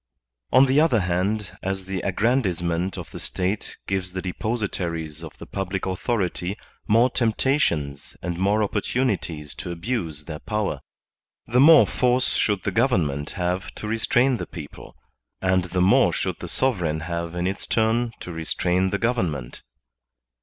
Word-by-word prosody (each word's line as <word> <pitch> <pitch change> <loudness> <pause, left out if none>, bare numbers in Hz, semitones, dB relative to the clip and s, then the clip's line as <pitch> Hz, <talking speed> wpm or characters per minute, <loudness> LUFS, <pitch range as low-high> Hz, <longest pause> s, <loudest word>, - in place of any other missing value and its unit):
On 130 +2 +7
the 135 +3 +4
other 130 -10 +3
hand, 95 +3 -1
as 95 0 -3
the 95 -1 -3
aggrandizement 95 -5 0
of - - -7
the - - -7
State 95 +3 -2
gives 95 -2 -2
the 95 - -3
depositaries 90 -6 -3
of 80 - -9
the - - -9
public 95 0 -3
authority 95 -1 -1 0.3
more 115 +3 +4
tempta 130 +5 +2
tions 70 - -1
and 85 -1 -3
more 105 +3 +2
opportunities 100 - -1
to - - -7
abuse 85 - -3
their 75 -3 -6
power, 105 -1 -2 0.6
the 125 - +2
more 155 +2 +8
force 125 0 +2
should 100 -3 +1
the - - -1
government 80 - +1
have 90 +1 -1
to 105 - -6
restrain 120 +3 +2
the - - -5
people, 75 -4 -10 0.4
and 95 -1 +2
the 90 0 -1
more 95 +2 +5
should - - -2
the - - -6
sovereign 90 -12 0
have 85 +1 -4
in 90 0 -1
its 95 +2 -2
turn 115 +1 +2
to 90 - -6
restrain 90 +3 0
the 100 - 0
government. 90 - -1
95 Hz, 155 wpm, -24 LUFS, 85-115 Hz, 0.6 s, more